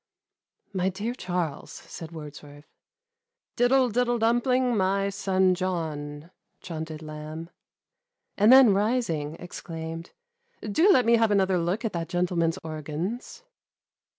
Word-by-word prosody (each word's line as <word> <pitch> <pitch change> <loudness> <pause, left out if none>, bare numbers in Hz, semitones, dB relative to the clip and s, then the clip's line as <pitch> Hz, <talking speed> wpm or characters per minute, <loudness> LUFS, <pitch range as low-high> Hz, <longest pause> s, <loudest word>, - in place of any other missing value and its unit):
"My 185 0 +1
dear 205 +6 -3
Charles," 180 - -3
said 165 -1 -9
Wordsworth, 150 -2 -10 0.5
" 475 +1 -63
Diddle 255 +1 +3
diddle 240 +1 +1
dumpling, 240 +2 +2
my 195 0 +1 0.2
«on 190 -1 +4
John," 160 -4 -4 0.3
chaunted 160 -2 -6
Lamh; 155 +2 -8 0.8
and 210 +3 +5
then 260 -5 +8
rising, 195 -8 0
exclaimed, 165 -1 -7 0.3
" 475 0 -42
Do 320 - +4
let 255 - +4
me 235 0 +5
have 225 -1 +3
another 190 -3 +2
look 180 +7 -1
at 220 - -2
that 165 -1 -3
gentleman's 175 -2 0
organs." 160 - -5
185 Hz, 125 wpm, -26 LUFS, 160-230 Hz, 0.8 s, then